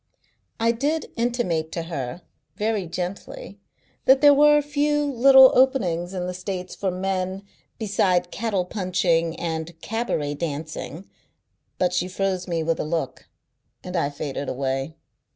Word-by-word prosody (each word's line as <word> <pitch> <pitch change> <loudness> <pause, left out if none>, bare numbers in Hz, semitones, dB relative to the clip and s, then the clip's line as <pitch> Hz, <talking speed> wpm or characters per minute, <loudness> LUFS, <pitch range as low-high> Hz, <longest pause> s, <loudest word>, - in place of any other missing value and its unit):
I 230 +1 +3
did 285 +7 -2
intimate 230 -10 -1
to 170 - -3
her, 155 -1 -5 0.3
very 210 -2 -1
gently, 185 +3 -6 0.5
that 265 0 +6
there 290 0 +7
were 295 +1 +6
a 295 - +1
few 295 0 +1
little 265 0 +7
openings 190 -10 +2
in 180 -1 -2
the 180 - -3
States 185 0 -5
for 195 - -2
men 185 +1 -2 0.3
beside 185 -4 +1
cattle 205 -5 -1
punching 180 -4 0
and 165 0 -4
cabaret 225 -10 -2
dancing, 155 +1 -5 0.7
but 180 -1 +1
she 180 0 0
froze 185 -1 -2
me 165 -2 -1
with 165 0 0
a - - 0
look, 160 +1 -3 0.6
and 180 0 -6
I 165 -5 +1
faded 145 -1 -5
away. 135 +3 -2
185 Hz, 140 wpm, -24 LUFS, 165-230 Hz, 0.7 s, there